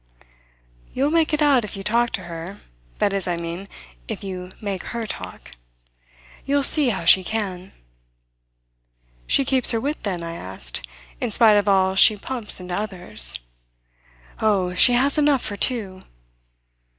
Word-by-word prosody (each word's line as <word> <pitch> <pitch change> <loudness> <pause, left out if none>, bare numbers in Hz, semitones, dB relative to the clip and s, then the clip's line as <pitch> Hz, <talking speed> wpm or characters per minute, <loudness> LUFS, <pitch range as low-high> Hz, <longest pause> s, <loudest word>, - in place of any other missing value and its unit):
"You'll 275 +3 +1
make 325 -1 +2
it 300 0 +1
out 275 -5 +3
if 210 - -7
you 195 - -7
talk 235 +4 +1
to 185 - -3
her 170 +3 -8 0.4
that 200 - 0
is, 195 -2 -2
I 175 - -1
mean, 170 +3 -6 0.4
if - - -6
you 185 -1 -7
make 200 -3 -4
her 235 -1 -5
talk. 90 - -8 0.9
You'll 280 0 0
see 290 -2 +4
how 190 -7 -3
she 185 +3 +7
can." 190 -3 -4 1.6
"She 275 - +3
keeps 260 -1 +1
her 230 - +3
wit 290 +6 -4
then," 180 -5 -4
I 165 0 -6
asked, 90 - -4 0.4
"in - - -2
spite 225 -2 +4
of 205 0 +1
all 190 -1 +3
she 210 +2 +6
pumps 230 -1 0
into 180 -1 -7
others?" 180 - -1 1.0
"Oh, 195 -4 +1
she 245 +7 +5
has 275 +5 +2
enough 290 -3 +2
for 205 - -3
two!" 200 -4 0
200 Hz, 155 wpm, -22 LUFS, 180-245 Hz, 1.6 s, she